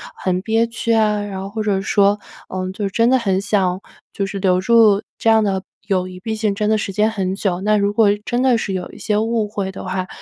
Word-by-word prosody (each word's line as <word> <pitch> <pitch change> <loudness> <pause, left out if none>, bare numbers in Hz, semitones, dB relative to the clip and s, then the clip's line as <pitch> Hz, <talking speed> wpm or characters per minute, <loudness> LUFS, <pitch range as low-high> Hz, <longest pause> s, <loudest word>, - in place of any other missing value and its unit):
很 185 -1 -1
憋 225 +3 +1
屈 230 0 -1
啊。 210 -2 +2
然 200 -2 -5
后 195 - -5
或 220 +2 -4
者 205 -2 0
说， 200 +1 +3 0.3
呃， 185 0 -4
就 200 +1 -3
真 230 +4 +2
的 260 0 +4
很 195 -5 0
想 195 -3 0 0.3
就 200 - -2
是 195 0 -5
留 185 -2 +2
住 215 -1 +4 0.2
这 225 - +2
样 220 -1 +5
的 195 -2 0 0.3
友 185 -2 0
谊， 185 0 -10
毕 220 +3 -3
竟 215 -2 0
真 210 +1 0
的 220 - +3
时 210 - -3
间 210 +3 +2
很 190 -4 -2
久。 190 -3 -1
那 210 +2 +2
如 200 0 +1
果 215 -1 +4 0.2
真 240 +1 0
的 255 -3 +4
是 195 - -3
有 185 -1 -4
一 - - -13
些 210 -2 0
误 220 0 0
会 200 -2 -3
的 190 - -8
话， 185 0 -3
205 Hz, 265 characters per minute, -19 LUFS, 190-220 Hz, 0.3 s, 样